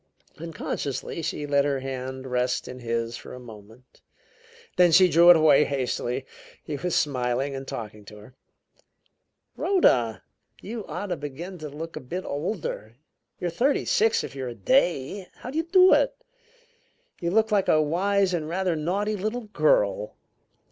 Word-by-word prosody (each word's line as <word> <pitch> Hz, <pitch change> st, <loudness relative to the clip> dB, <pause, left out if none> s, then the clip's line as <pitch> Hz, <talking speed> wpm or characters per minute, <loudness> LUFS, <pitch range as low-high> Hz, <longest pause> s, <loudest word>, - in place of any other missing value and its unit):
Unconsciously 160 Hz, -2 st, -4 dB
she 150 Hz, -1 st, -3 dB
let 140 Hz, -1 st, +2 dB
her 140 Hz, -1 st, 0 dB
hand 130 Hz, 0 st, -6 dB
rest 125 Hz, 0 st, -1 dB
in 125 Hz, -, -8 dB
his 115 Hz, -1 st, -2 dB
for -, -, -10 dB
a -, -, -9 dB
moment, 110 Hz, +1 st, -15 dB, 0.7 s
then 180 Hz, -1 st, +5 dB
she 185 Hz, +3 st, +7 dB
drew 170 Hz, +1 st, +6 dB
it 175 Hz, -, +10 dB
away 155 Hz, -2 st, +5 dB
hastily. 130 Hz, -2 st, -2 dB, 0.4 s
He 150 Hz, -, -5 dB
was 175 Hz, +4 st, -2 dB
smiling 130 Hz, 0 st, 0 dB
and 135 Hz, 0 st, -7 dB
talking 105 Hz, -2 st, -7 dB
to 105 Hz, -, -12 dB
her. 105 Hz, +5 st, -15 dB, 1.2 s
"Rhoda! 120 Hz, -, +2 dB, 0.4 s
You 220 Hz, 0 st, -7 dB
ought 205 Hz, -, -5 dB
to 175 Hz, -, -2 dB
begin 155 Hz, +6 st, -7 dB
to 155 Hz, -1 st, -6 dB
look 160 Hz, +3 st, -7 dB
a -, -, -4 dB
bit 180 Hz, +9 st, -5 dB
older! 145 Hz, -, -4 dB, 0.4 s
You're 175 Hz, -, -2 dB
thirty 255 Hz, -, +1 dB
six, 455 Hz, -2 st, +2 dB
if -, -, -7 dB
you're 130 Hz, -2 st, -5 dB
a 120 Hz, -, -8 dB
day! 185 Hz, -, +1 dB
How 250 Hz, -, -8 dB
do 300 Hz, -, -5 dB
you 325 Hz, -, -1 dB
do 370 Hz, +2 st, +6 dB
it? -, -, +3 dB, 1.0 s
You 170 Hz, -, -1 dB
look 220 Hz, +4 st, +2 dB
like 200 Hz, -2 st, +2 dB
a 155 Hz, -, +4 dB
wise 185 Hz, +5 st, +1 dB
and 160 Hz, -3 st, -2 dB
rather 180 Hz, 0 st, 0 dB
naughty 195 Hz, +7 st, -1 dB
little 215 Hz, +3 st, -4 dB
girl." -, -, +1 dB
155 Hz, 160 wpm, -25 LUFS, 130-195 Hz, 1.2 s, it